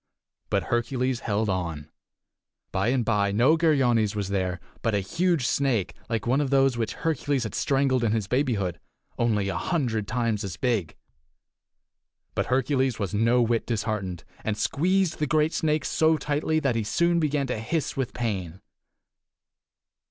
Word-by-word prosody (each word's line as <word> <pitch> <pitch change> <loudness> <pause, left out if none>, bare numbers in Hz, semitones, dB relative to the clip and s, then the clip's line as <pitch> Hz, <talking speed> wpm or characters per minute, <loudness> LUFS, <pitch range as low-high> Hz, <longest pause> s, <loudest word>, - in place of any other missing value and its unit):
But - - +1
Hercules 125 +1 -1
held 105 +1 -1
on. 85 -6 -2 0.8
By 95 +3 0
and 125 -1 +1
by 100 -3 +2
no 120 +10 +4
Geryones 125 -10 +2
was 100 -2 -2
there, 95 -3 -1 0.2
but 115 -2 0
a - - +2
huge 165 - 0
snake 125 -8 +1 0.2
like 115 -3 -1
one 130 +5 +2
of 140 - -1
those 135 -2 +3
which 115 -2 -2
Hercules 145 -4 0
had 110 - -5
strangled 135 -2 +1
in 110 - +2
his 110 -3 -1
babyhood, 105 - 0 0.4
only 105 -4 +1
a 95 - -2
hundred 120 - -1
times 115 -3 -1
as 95 -3 -5
big. 110 -11 -1 1.4
But - - -1
Hercules 130 -1 +1
was 100 -3 -3
no 115 +4 +3
whit 115 0 0
disheartened, 105 -6 -2 0.2
and 105 -1 -1
squeezed 180 - +1
the 150 - 0
great 155 +3 +2
snake 155 -2 0
so 160 0 +3
tightly 150 +2 0
that 135 -6 0
he 115 - 0
soon 170 +10 +2
began 150 -3 +1
to 125 -4 -3
hiss 150 +8 -2
with 130 -2 -2
pain. 95 -7 -3
120 Hz, 160 wpm, -26 LUFS, 105-140 Hz, 1.4 s, no